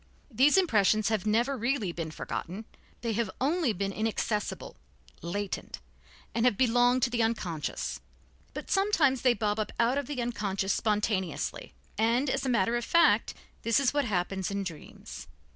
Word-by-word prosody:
These 270 - +4
impressions 215 - +3
have 215 -2 -1
never 235 +6 +2
really 240 -5 -1
been 165 -2 -5
forgotten, 185 +6 -5 0.4
they 230 -1 -1
have 225 -1 -1
only 300 0 +1
been 195 0 -2
inaccessible, 215 0 -2 0.5
latent, 195 +4 -4 0.6
have 230 -2 +2
belonged 245 0 +3
to 250 - +2
the 235 -1 0
unconscious. 185 -9 -2 0.6
But - - -6
sometimes 365 -10 +3
they 250 -2 +4
bob 210 0 -1
up 215 - -2
out 240 +4 +3
of 280 - -5
the 290 -3 -4
unconscious 200 -5 -1
spontaneously, 210 - -1 0.2
and, 240 +5 +2
as - - -1
a - - +1
matter 230 -1 +2
of 240 - -3
fact, 335 +7 +3 0.3
this 230 +2 +2
is 275 -1 +1
what 290 -2 +1
happens 190 -2 -1
in 200 0 -2
dreams. 170 -5 -9
225 Hz, 155 wpm, -29 LUFS, 200-255 Hz, 0.6 s, These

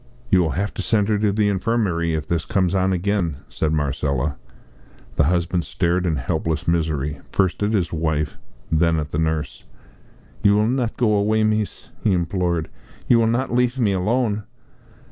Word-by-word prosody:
"You 95 - +6
will 80 -4 0
have 100 +2 -1
to - - -4
send 105 -2 +1
her 105 -1 +2
to 105 -1 +2
the 105 +1 +2
infirmary 95 -5 0
if 75 -1 -3
this 85 -2 0
comes 95 -4 0
on 95 0 +2
again," 90 -3 0
said 80 - -1
Marcella. 70 -2 -1 0.8
The 75 - +3
husband 85 +1 +1
stared 85 +5 0
in 80 - +1
helpless 80 +4 -2
misery, 75 -4 0
first 95 0 +1
at 105 +2 +1
his 90 -6 0
wife, 80 -2 -1 0.3
then 80 +1 +3
at 75 0 -4
the 75 - -1
nurse. 80 -1 -2 0.8
"You 100 0 +5
will 105 +1 +3
not 120 -1 -1
go 115 -3 +2
away, 105 +1 +2
mees," 110 -1 -1
he 105 - +3
implored, 85 -2 0 0.4
"you 120 - +5
will 115 - +3
not 120 +3 0
leaf 125 +1 +2
me 110 -6 +2
alone?" 105 +3 0
90 Hz, 175 wpm, -22 LUFS, 80-105 Hz, 0.8 s, You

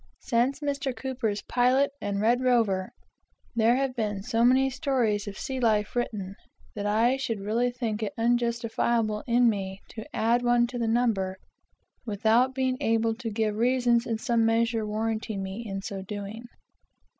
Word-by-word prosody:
Since 255 +4 0
Mr. 280 -3 -2
Cooper's 250 -6 -3
Pilot 255 +3 +2
and 200 -1 -2
Red 235 +4 +2
Rover, 225 -7 +2 0.7
there 230 +1 +4
have 265 -1 -1
been 205 -4 -2
so 230 +2 +1
many 260 +2 +5
stories 245 -6 0
of 200 -1 -6
sea 265 -1 -4
life 215 -3 +1
written, 205 -5 -2 0.4
that 205 -1 -3
I 230 +5 +3
should 230 -5 -3
really 225 +5 0
think 230 -3 -3
it 210 -2 -2
unjustifiable 235 -2 0
in 240 0 +4
me 195 -3 -1
to 220 - -7
add 235 +2 +2
one 240 0 +3
to 245 0 -5
the 230 - 0
number 220 -5 +1 0.7
without 230 +4 +2
being 260 -1 0
able 225 -2 +2
to 230 0 -5
give 215 -1 -1
reasons 240 0 +2
in 225 -2 -1
some 235 -1 +1
measure 225 -1 +1
warranting 215 -1 -2
me 190 +4 -5
in 195 -3 -5
so 195 -1 -5
doing. 205 +3 -7
230 Hz, 160 wpm, -27 LUFS, 210-245 Hz, 0.7 s, many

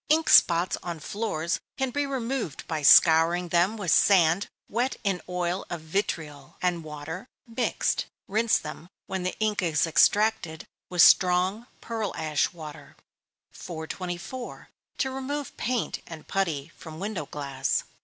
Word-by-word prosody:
_ - - -67
Ink 320 +1 +3
spots 175 +1 +5
on 170 -2 -5
floors 170 -4 -2 0.2
can 265 -1 -1
be 285 +2 -1
removed 250 - -3
by 160 -2 -2
scouring 165 +4 +6
them 175 +6 +2
with 190 -5 -1
sand 180 -1 +4 0.2
wet 245 +4 -1
in 195 -4 0
oil 180 +1 -2
of 175 - -4
vitriol, 155 -5 -4
and 175 -2 -1
water, 155 +6 -7 0.2
mixed. 235 0 -1 0.2
Rinse 220 +3 +2
them, 155 +3 -8 0.2
when 190 -1 -4
the 180 +1 -3
ink 215 -2 0
is 165 -3 +1
extracted, 185 -1 +2 0.2
with 180 -1 +5
strong 185 +5 +4
pearl 220 -4 -4
ash 155 -2 0
water. 155 -4 -11 0.6
424. 175 +8 -7 0.3
_To 265 -1 -1
remove 275 +1 -4
Paint 245 -2 -2
and 160 -2 -10
Putty 170 -6 -2
from 160 -1 -10
Window 190 -7 -4
Glass. 140 -2 -2
180 Hz, 140 wpm, -26 LUFS, 160-220 Hz, 0.6 s, scouring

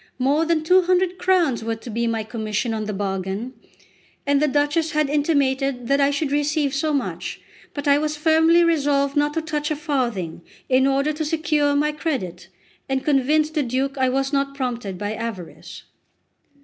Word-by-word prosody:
More 280 +5 +2
than 325 -1 +1
two 365 +4 +5
hundred 365 0 +1
crowns 340 -11 +2
were 225 0 -2
to 225 +2 -11
be 235 +2 -1
my 225 -1 -1
commission 220 +1 -3
on 215 -1 -3
the 210 - -3
bargain, 195 +4 -3 0.7
and 285 0 +2
the 300 - +3
Duchess 295 +3 +1
had 305 -2 +1
intimated 275 -4 0
that 275 +1 +3
I 280 - +4
should 285 0 -1
receive 295 -1 0
so 305 +2 0
much; 280 -3 -3 0.4
but 285 -1 -4
I 285 0 +5
was 305 0 -2
firmly 320 +2 +4
resolved 285 -4 +1
not 295 0 +1
to 325 - -1
touch 300 -1 -2
a 305 - 0
farthing, 240 - -2 0.3
in 260 +1 +3
order 275 +3 +1
to 310 +1 -3
secure 300 -2 +1
my 300 +1 +2
credit, 235 - -4 0.4
and 265 0 -1
convince 300 +2 +2
the 310 -1 0
Duke 265 +2 -1
I 260 -1 +1
was 270 +2 -1
not 275 0 0
prompted 240 -8 -3
by 205 +2 -3
avarice. 220 -6 -7
280 Hz, 180 wpm, -22 LUFS, 245-305 Hz, 0.7 s, two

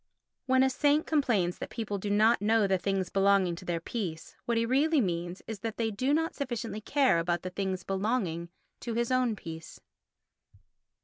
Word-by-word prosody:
When 260 0 +4
a 265 - +4
saint 290 +3 +2
complains 230 - +1
that - - -5
people 215 -4 -4
do 205 - -4
not 215 +3 +4
know 220 0 +3
the 190 -1 +1
things 190 0 -1
belonging 195 -2 +3
to 185 - -10
their 175 -2 -1
peace, 170 -3 -5
what 235 -1 0
he 230 - +2
really 290 +6 +3
means 175 -3 -2
is 220 -3 -6
that 225 +1 -5
they 225 -1 0
do 255 +7 -1
not 325 +4 +1
sufficiently 235 -5 -4
care 260 - +3
about 170 0 -1
the 185 - -5
things 190 -1 -3
belonging 190 -4 -1 0.3
to 235 -2 -4
his 235 +1 0
own 255 -3 +2
peace. 165 -4 -9
210 Hz, 185 wpm, -29 LUFS, 185-250 Hz, 0.3 s, When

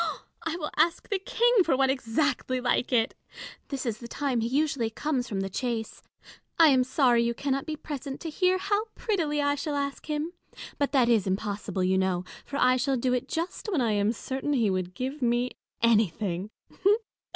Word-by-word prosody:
I 325 0 -2
will 300 -3 -4
ask 330 +2 +2
the 400 - 0
King 465 +2 +3
for 300 -6 +2
one 265 0 +4
exactly 255 0 0
like 245 +1 0
it. 235 0 +2 0.5
This 275 -2 -4
is 220 -3 -2
the 235 - -8
time 260 -1 -1
he 225 - 0
usually 275 -3 +1
comes 255 0 -2
from 195 -2 -2
the 195 - -2
chase. 230 +2 -3 0.6
I 330 -2 +8
am 260 -2 +5
sorry 255 -2 +3
you 235 0 0
cannot 275 +2 -1
be 310 - -2
present 280 -2 -6
to 325 - -4
hear 370 +3 +2
how 405 +3 0
prettily 315 -9 0
I 285 0 +2
shall 290 +1 -3
ask 280 -1 -3
him: 305 +3 -2 0.5
but 285 -2 +1
that 255 -4 +4
is 225 -5 +3
impossible, 200 0 -2
you 190 +1 +2
know; 185 -1 0 0.2
for 280 - -4
I 255 -2 +4
shall 270 +1 +1
do 250 +1 +1
it 250 - -1
just 340 +6 -3
when 345 - +1
I 235 -3 +2
am 205 +1 +2
certain 265 +4 -3
he 230 -7 +2
would 185 -1 -2
give 265 +3 -4
me 240 +1 +1 0.3
anything. 205 -4 +2
260 Hz, 195 wpm, -27 LUFS, 230-300 Hz, 0.6 s, I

